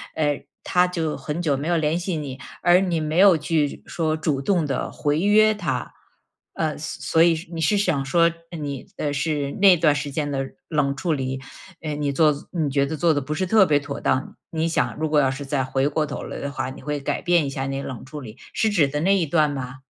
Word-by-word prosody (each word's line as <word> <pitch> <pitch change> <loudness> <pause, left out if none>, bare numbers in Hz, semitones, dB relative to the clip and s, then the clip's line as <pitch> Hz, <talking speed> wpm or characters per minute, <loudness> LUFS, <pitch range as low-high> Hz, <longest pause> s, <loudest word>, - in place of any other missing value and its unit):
呃， 145 -2 0 0.2
他 180 0 +3
就 165 -4 -2
很 150 +2 -4
久 155 -5 +1
没 140 +3 -4
有 175 0 +2
联 160 +1 +1
系 175 -1 -2
你， 140 -3 -6 0.2
而 175 +1 +6
你 180 -4 0
没 155 +2 -1
有 190 -3 +7
去 150 -1 -1
说 160 -2 -1
主 150 -3 -1
动 175 +1 +1
地 135 -3 -2
回 145 +1 0
约 215 +3 +5
他。 210 - -3 0.6
呃， 155 -2 -1
所 155 +1 -1
所 - - +9
以 170 -1 +4 0.2
你 165 - -3
是 205 +7 +3
想 180 -9 +1
说 170 +5 +3 0.3
你 140 -3 -5
呃， 145 -1 -1
是 145 -1 -1
那 195 -3 +7
段 155 -2 +4
时 145 0 -3
间 145 +1 -2
的 135 -1 -1 0.3
冷 145 -3 +1
处 160 +3 -1
理， 130 -2 -2 0.4
呃， 155 -2 -3
你 145 -1 -1
做 150 +2 +4 0.2
你 165 -5 0
觉 140 0 +2
得 155 +2 -4
做 165 +2 +3
得 145 - 0
不 150 +3 -4
是 185 - 0
特 210 +2 +5
别 145 -2 +3
妥 140 -1 -6
当。 130 +2 0
你 160 0 -1
想 165 - 0
如 155 +1 -1
果 150 -1 +3
要 135 -2 +3
是 135 +2 -5
再 135 -1 0
回 135 +1 0
过 150 +1 0
头 145 - -5
来 - - -6
的 140 - -4
话， 130 -2 -3
你 130 - -11
会 150 -1 -3
改 140 - -2
变 175 -4 +3
一 - - -2
下 135 0 -3
你 135 0 -3
冷 130 -3 -6
处 150 +2 -8
理， 115 -2 -10 0.2
是 220 - +1
指 165 -8 +3
的 150 +2 -3
那 195 +4 +4
一 175 -5 +1
段 150 -1 +2
吗？ 130 -2 -6
150 Hz, 255 characters per minute, -23 LUFS, 140-170 Hz, 0.6 s, 所